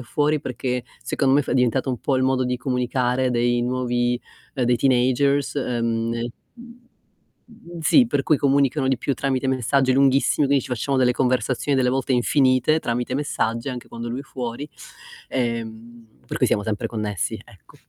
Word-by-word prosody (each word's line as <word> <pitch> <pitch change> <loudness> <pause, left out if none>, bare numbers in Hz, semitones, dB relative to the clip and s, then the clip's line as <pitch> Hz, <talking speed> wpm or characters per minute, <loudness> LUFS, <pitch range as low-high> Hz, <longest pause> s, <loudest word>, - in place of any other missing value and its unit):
è - - -6
fuori 150 +4 0
perché, 125 -1 -3 0.2
secondo 135 -2 +1
me 145 - +5
è - - -2
fa - - -4
è - - 0
diventato 125 0 +1
un 125 - -3
po' 135 - 0
il 130 - +1
modo 130 -1 +1
di 125 0 -1
comunicare 125 0 0
dei 120 0 +1
nuovi, 125 -1 0 0.3
ehm, 130 -3 0
dei 120 0 +3
teenagers, 130 +2 +2
uhm, 115 -4 -1
e 115 0 -3 0.2
mhmm, 240 +1 -14 1.0
sì, 245 - +5
per 145 -11 0
cui 150 0 +2
comunicano 140 -1 +2
di 135 - +2
più 140 - -2
tramite 135 -1 -1
messaggi 130 +1 +1
lunghissimi, 135 +2 +3
quindi 140 -1 +2
ci - - -9
facciamo 125 +3 -1
delle 125 -1 +3
conversazioni 130 +2 0
delle 125 -1 +2
volte 135 0 -1
infinite, 130 +4 +3
tramite 125 0 -2
messaggi 115 -3 -2
anche 125 -2 -6
quando 115 0 -7
lui 125 +3 -4
è - - -8
fuori, 125 -1 -6 0.6
ehm, 115 -1 -4 0.2
per - - -4
cui - - +3
siamo 105 - +1
sempre 110 +2 -2
connessi, 105 -6 -3
ecco. - - -20
130 Hz, 180 wpm, -22 LUFS, 120-135 Hz, 1.0 s, me